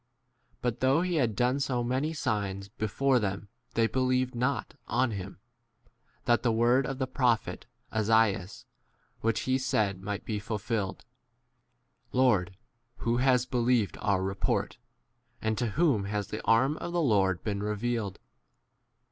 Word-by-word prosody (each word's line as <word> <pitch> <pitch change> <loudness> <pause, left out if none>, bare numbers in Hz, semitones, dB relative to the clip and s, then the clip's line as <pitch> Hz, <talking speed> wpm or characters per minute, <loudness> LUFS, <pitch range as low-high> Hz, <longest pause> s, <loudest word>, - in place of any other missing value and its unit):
But 120 -1 -1
though 135 +6 +3
he 180 -2 0
had 120 -7 +1
done 125 +5 +2
so 130 -3 0
many 130 +6 0
signs 100 -9 -2
before 125 +6 +1
them 100 -1 -3 0.3
they 115 - +4
believed 130 +1 +1
not 125 +4 -1
on 130 - +2
7 - - -3
him, 95 +1 -10 0.8
88 - - -38
that 120 -3 +3
the 120 - +2
word 120 +4 +3
of 135 - -3
the 130 - 0
prophet 125 -3 0 0.3
Esaias 110 -3 +1 0.5
which 115 -1 0
he 130 0 +1
said 105 -7 0
might 100 +1 -4
be 105 -2 -2
fulfilled, 105 -1 -3 1.1
Lord, 100 -8 +2 0.4
who 120 +1 0
has 125 -1 +3
believed 120 -4 +1
our 100 -2 +1
report? 95 +1 -1 0.6
and 110 0 0
to 120 - +1
whom 125 - +2
has 105 0 -3
the 110 - -5
arm 130 +7 +3
of 175 - -5
the 175 - +1
Lord 100 - +2
been 100 -2 -2
re 105 +1 -1
39 - - -9
vealed 115 -5 -2
115 Hz, 155 wpm, -29 LUFS, 105-130 Hz, 1.1 s, they